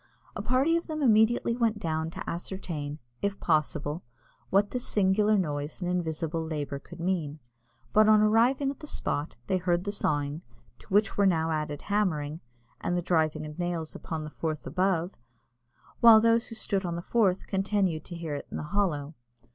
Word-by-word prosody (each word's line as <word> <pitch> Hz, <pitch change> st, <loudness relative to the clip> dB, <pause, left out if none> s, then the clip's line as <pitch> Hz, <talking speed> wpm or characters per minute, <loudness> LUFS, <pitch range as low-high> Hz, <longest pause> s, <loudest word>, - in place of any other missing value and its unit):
A -, -, -3 dB
party 270 Hz, +6 st, +2 dB
of 335 Hz, -, -5 dB
them 310 Hz, -2 st, -3 dB
immediately 230 Hz, 0 st, +4 dB
went 230 Hz, -3 st, +1 dB
down 160 Hz, -4 st, -2 dB
to -, -, -8 dB
ascertain, 170 Hz, -4 st, -4 dB, 0.2 s
if 200 Hz, 0 st, -1 dB
possible, 155 Hz, 0 st, 0 dB, 0.5 s
what 200 Hz, +1 st, +3 dB
this 250 Hz, -1 st, -2 dB
singular 205 Hz, +1 st, +3 dB
noise 150 Hz, -4 st, -2 dB
and 180 Hz, -, -3 dB
invisible 165 Hz, -2 st, -1 dB
labour 150 Hz, -3 st, -4 dB
could 140 Hz, -, -13 dB
mean; 165 Hz, -4 st, -1 dB, 0.6 s
but 215 Hz, 0 st, +6 dB
on 215 Hz, 0 st, +7 dB
arriving 235 Hz, +6 st, +3 dB
at 280 Hz, -, -11 dB
the 300 Hz, -, -9 dB
spot, 145 Hz, -, -3 dB
they 190 Hz, -, +1 dB
heard 175 Hz, -1 st, 0 dB
the 200 Hz, -, -2 dB
sawing, 145 Hz, -5 st, -1 dB, 0.4 s
to -, -, -18 dB
which 210 Hz, +3 st, +2 dB
were 200 Hz, -1 st, +4 dB
now 165 Hz, -3 st, +2 dB
added 150 Hz, -2 st, -3 dB
hammering, 165 Hz, -8 st, 0 dB, 0.4 s
and 175 Hz, -, -1 dB
the 175 Hz, -, -1 dB
driving 155 Hz, -3 st, +1 dB
of 150 Hz, +2 st, -9 dB
nails 175 Hz, -2 st, -2 dB
upon 160 Hz, -2 st, -5 dB
the 155 Hz, -, -7 dB
Forth 155 Hz, -2 st, -4 dB
above, 185 Hz, -2 st, 0 dB, 0.9 s
whilst 225 Hz, -2 st, +9 dB
those 230 Hz, 0 st, +3 dB
who 225 Hz, -, -8 dB
stood 200 Hz, -3 st, 0 dB
on 170 Hz, -2 st, -2 dB
the 170 Hz, -, -5 dB
Forth 195 Hz, -5 st, +2 dB
continued 195 Hz, -4 st, 0 dB
to 175 Hz, -, -8 dB
hear 165 Hz, -3 st, -4 dB
it 145 Hz, -, -5 dB
in -, -, -5 dB
the -, -, -4 dB
hollow. 160 Hz, -8 st, 0 dB
180 Hz, 180 wpm, -28 LUFS, 155-210 Hz, 0.9 s, whilst